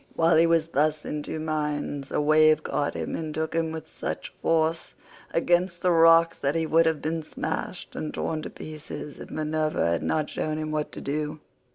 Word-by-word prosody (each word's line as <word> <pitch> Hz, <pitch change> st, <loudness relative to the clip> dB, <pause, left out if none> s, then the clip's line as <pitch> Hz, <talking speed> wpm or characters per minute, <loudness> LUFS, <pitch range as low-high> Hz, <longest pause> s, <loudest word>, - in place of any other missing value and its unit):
While 165 Hz, 0 st, +4 dB
he 165 Hz, +1 st, +6 dB
was 165 Hz, -1 st, +2 dB
thus 150 Hz, 0 st, +1 dB
in 150 Hz, -, -3 dB
two 155 Hz, -, -5 dB
minds 150 Hz, -2 st, -2 dB
a -, -, +1 dB
wave 155 Hz, +1 st, +5 dB
caught 145 Hz, -1 st, -1 dB
him -, -, -3 dB
and 155 Hz, -2 st, -4 dB
took 160 Hz, 0 st, -2 dB
him 165 Hz, -1 st, 0 dB
with 160 Hz, -1 st, -6 dB
such -, -, -5 dB
force 165 Hz, 0 st, +1 dB, 0.4 s
against 175 Hz, +1 st, +1 dB
the 180 Hz, -, +4 dB
rocks 165 Hz, 0 st, +6 dB
that 140 Hz, +2 st, 0 dB
he 165 Hz, -1 st, +1 dB
would 165 Hz, +1 st, +4 dB
have 160 Hz, -2 st, 0 dB
been 160 Hz, +1 st, -1 dB
smashed 155 Hz, -, -5 dB
and 155 Hz, -, -3 dB
torn 155 Hz, -1 st, -2 dB
to -, -, -6 dB
pieces 150 Hz, -1 st, -8 dB
if -, -, -9 dB
Minerva 155 Hz, -, 0 dB
had 85 Hz, -, 0 dB
not 155 Hz, -1 st, 0 dB
shown 155 Hz, 0 st, -2 dB
him 155 Hz, 0 st, -3 dB
what 150 Hz, -1 st, -2 dB
to -, -, -7 dB
do. 150 Hz, +2 st, -3 dB
155 Hz, 200 wpm, -26 LUFS, 150-165 Hz, 0.4 s, he